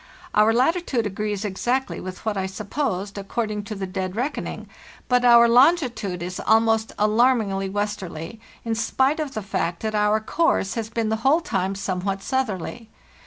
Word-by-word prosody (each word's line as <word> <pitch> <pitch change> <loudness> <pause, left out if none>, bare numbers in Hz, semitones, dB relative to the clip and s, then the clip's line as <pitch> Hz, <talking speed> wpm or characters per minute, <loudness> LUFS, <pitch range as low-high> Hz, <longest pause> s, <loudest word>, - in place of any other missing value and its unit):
Our 215 +1 +5
latitude 255 0 +1
agrees 205 +1 -3
exactly 240 +7 -1
with 185 +3 -8
what 215 -1 0
I 190 -1 -1
supposed, 200 0 -3
according 210 0 -3
to 215 0 -5
the 195 -1 -4
dead 185 0 -4
reckoning, 255 +6 -3 0.4
but 250 -1 +3
our 235 -1 +7
longitude 245 - +3
is 180 +1 -5
almost 225 0 +2
alarmingly 210 -3 +2
westerly, 205 -2 -4 0.3
in 230 - 0
spite 265 +6 +1
of 295 -3 -4
the 215 - -3
fact 170 -2 -2
that 220 0 -1
our 210 0 +2
course 220 -3 +1
has 225 -2 -4
been 225 -1 -1
the 220 - 0
whole 270 +8 +3
time 190 - -1
somewhat 195 0 -3
southerly. 230 -3 -3
215 Hz, 160 wpm, -23 LUFS, 195-240 Hz, 0.4 s, our